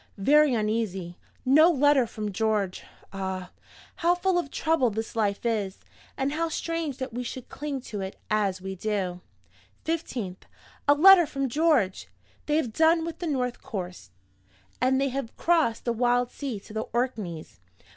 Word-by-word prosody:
Very 285 +6 +4
uneasy. 210 -5 -2 0.3
No 305 +6 +7
letter 290 -5 +4
from 210 -1 -5
George. 210 -2 -1 0.3
Ah, 190 -2 -4 0.5
how 345 +1 +3
full 360 0 +1
of 340 - -4
trouble 315 -4 +1
this 220 +2 -5
life 210 -1 0
is! 210 -5 -1 0.4
and 270 +1 0
how 330 +2 -1
strange 325 -4 -3
that 260 -3 -5
we 245 - -3
should 250 +1 -7
cling 285 -2 -4
to 210 -4 -6
it 190 0 -6
as 200 -3 0
we 190 0 -5
do! 190 -2 -2 0.6
"15th. 245 - -3 0.4
A 285 - +6
letter 355 +1 +8
from 275 -2 -2
George! 285 - +2 0.4
They 300 - +2
have 245 -9 -1
done 325 +3 +4
with 335 - -6
the 350 - -3
north 250 -5 -1
coast 180 - -6 0.7
and 265 +1 +3
they 275 0 +1
have 265 -3 -5
crossed 320 -10 +2
the 235 - +1
wild 245 +1 +1
sea 265 -8 -5
to 210 - -13
the 220 +1 -3
Orkneys. 215 -10 -3
245 Hz, 160 wpm, -27 LUFS, 205-300 Hz, 0.7 s, letter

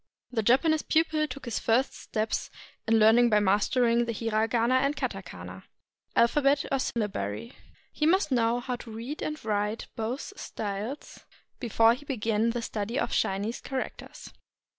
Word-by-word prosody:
The 230 -3 0
Japanese 300 +8 +3
pupil 315 -1 +1
took 280 -2 -8
his 235 -3 -2
first 240 +4 +2
steps 215 0 -2 0.4
in 225 0 +4
learning 225 +2 +6
by 210 -1 +4
mastering 230 +4 +2
the 230 - -2
Mragana 225 +3 +1
and 275 +2 +1
katakana - - -6 0.5
[alphabet 275 +4 +3
or 275 - +2
sylla 230 -4 -1
bary]. 105 - -5 0.4
He 300 - +1
must 370 -2 +3
know 235 -1 +2
how 250 0 -3
to 235 - -11
read 230 +7 -6
and 305 0 -3
write 210 +1 -1
both 240 - -4
styles 210 - -6 0.4
before 230 -2 +4
he 275 +4 -9
began 225 -4 0
the 235 0 -2
study 220 +3 -3
of - - 0
Chinese 200 +5 -1
characters. 265 -1 -6
235 Hz, 150 wpm, -28 LUFS, 220-270 Hz, 0.5 s, learning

